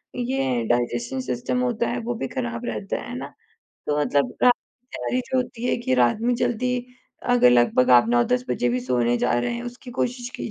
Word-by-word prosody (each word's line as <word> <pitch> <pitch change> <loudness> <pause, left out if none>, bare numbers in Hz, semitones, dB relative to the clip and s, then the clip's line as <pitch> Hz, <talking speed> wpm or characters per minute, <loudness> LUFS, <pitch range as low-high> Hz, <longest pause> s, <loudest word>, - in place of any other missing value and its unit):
ये 135 - -1
digestion 120 +1 0
system 130 - -2
होता 240 -2 0
है 245 +1 -2
वो 240 +1 -3
भी 135 - -3
खराब 120 -2 -4
रहता 105 -4 -3
है, - - -9
है - - -5
ना? - - -7 0.5
तो 150 0 0
मतलब 140 -4 +1
रात 250 - +7 0.3
कि 250 - -47
तैयारी 255 - -1
जो 260 - +1
होती 245 -1 -2
है - - +1
कि 235 - 0
रात 125 - +3
में 245 +1 +1
जल्दी 250 +1 0 0.6
अगर 240 - +6
लगभग 125 +1 +4
आप 120 -2 +6
9-10 120 +1 +2
बजे 120 0 0
भी 125 +1 0
सोने 120 -1 +1
जा 120 - +1
रहे 235 - -1
हैं 240 - -5
उसकी 245 +1 -9
कोशिश 245 0 -2
की - - -5
130 Hz, 210 wpm, -24 LUFS, -, 0.6 s, रात